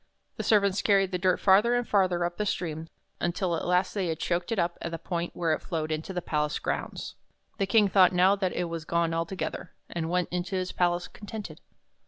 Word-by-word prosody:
The -, -, -3 dB
servants 200 Hz, -2 st, +3 dB
carried 195 Hz, -2 st, +3 dB
the 180 Hz, -, -1 dB
dirt 185 Hz, 0 st, +2 dB
farther 205 Hz, +5 st, +5 dB
and 245 Hz, -1 st, 0 dB
farther 185 Hz, -4 st, +2 dB
up 175 Hz, 0 st, -4 dB
the 210 Hz, -, -1 dB
stream, 160 Hz, -4 st, -3 dB, 0.3 s
until 175 Hz, +1 st, -1 dB
ht -, -, -3 dB
last 180 Hz, +1 st, +2 dB
they 195 Hz, -4 st, -1 dB
had 160 Hz, -1 st, -2 dB
choked 175 Hz, +4 st, -1 dB
it 225 Hz, -, 0 dB
up 170 Hz, -1 st, 0 dB
at -, -, -3 dB
the 165 Hz, -, -4 dB
point 170 Hz, +1 st, -4 dB
where 165 Hz, -2 st, +1 dB
it -, -, -2 dB
flowed 160 Hz, -2 st, -3 dB
into 155 Hz, +4 st, -3 dB
the 180 Hz, -2 st, -3 dB
palace 150 Hz, -1 st, -1 dB
grounds. -, -, -4 dB, 0.5 s
The 195 Hz, -, +1 dB
King 210 Hz, +1 st, +5 dB
thought 190 Hz, -2 st, +5 dB
now 185 Hz, +2 st, +4 dB
that 190 Hz, -2 st, -1 dB
it 180 Hz, -, -1 dB
was 165 Hz, -2 st, -4 dB
gone 170 Hz, 0 st, 0 dB
altogether, 165 Hz, +1 st, -3 dB, 0.2 s
and 165 Hz, -1 st, -3 dB
went 180 Hz, 0 st, 0 dB
into 180 Hz, +2 st, -2 dB
his 185 Hz, 0 st, -2 dB
palace 175 Hz, 0 st, 0 dB
con 205 Hz, -, -13 dB
tented. 200 Hz, -8 st, -7 dB
180 Hz, 225 wpm, -28 LUFS, 170-195 Hz, 0.5 s, farther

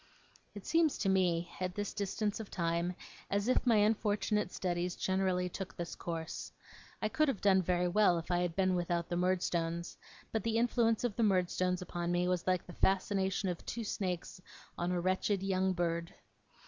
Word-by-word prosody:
It 205 Hz, -, -8 dB
seems 325 Hz, -2 st, +3 dB
to 195 Hz, -, 0 dB
me, 175 Hz, -3 st, +2 dB
at 185 Hz, 0 st, -2 dB
this 205 Hz, -1 st, -3 dB
distance 205 Hz, +1 st, -2 dB
of 220 Hz, -, -6 dB
time, 170 Hz, +1 st, -1 dB, 0.3 s
as 200 Hz, +2 st, 0 dB
if 255 Hz, 0 st, +2 dB
my 235 Hz, -, +6 dB
unfortunate 210 Hz, -1 st, +2 dB
studies 175 Hz, -1 st, -2 dB
generally 185 Hz, -1 st, 0 dB
took 185 Hz, +1 st, -6 dB
this 170 Hz, -1 st, -4 dB
course. 165 Hz, -1 st, -5 dB, 0.5 s
I -, -, +3 dB
could 310 Hz, +8 st, +2 dB
have 270 Hz, -8 st, 0 dB
done 190 Hz, -2 st, +4 dB
very 180 Hz, 0 st, +1 dB
well 180 Hz, -1 st, +4 dB
if 165 Hz, +2 st, -5 dB
I 175 Hz, -, +3 dB
had 175 Hz, -2 st, -1 dB
been 185 Hz, -1 st, +2 dB
without 175 Hz, -1 st, -1 dB
the 175 Hz, -, -1 dB
Murdstones; 175 Hz, -2 st, 0 dB, 0.3 s
but 220 Hz, -, 0 dB
the 225 Hz, 0 st, +1 dB
influence 230 Hz, -1 st, +2 dB
of 235 Hz, -5 st, -1 dB
the -, -, +1 dB
Murdstones 180 Hz, -2 st, +1 dB
upon 175 Hz, -1 st, -3 dB
me 175 Hz, 0 st, +1 dB
was 180 Hz, -1 st, -1 dB
like 185 Hz, -1 st, +1 dB
the 175 Hz, -, -10 dB
fascination 195 Hz, +1 st, +1 dB
of 175 Hz, -2 st, -3 dB
two 235 Hz, -, -4 dB
snakes 180 Hz, -3 st, -3 dB, 0.3 s
on 175 Hz, +1 st, -1 dB
a 180 Hz, -, 0 dB
wretched 190 Hz, +2 st, 0 dB
young 190 Hz, -1 st, +1 dB
bird. 170 Hz, -1 st, -1 dB
185 Hz, 185 wpm, -33 LUFS, 175-205 Hz, 0.5 s, my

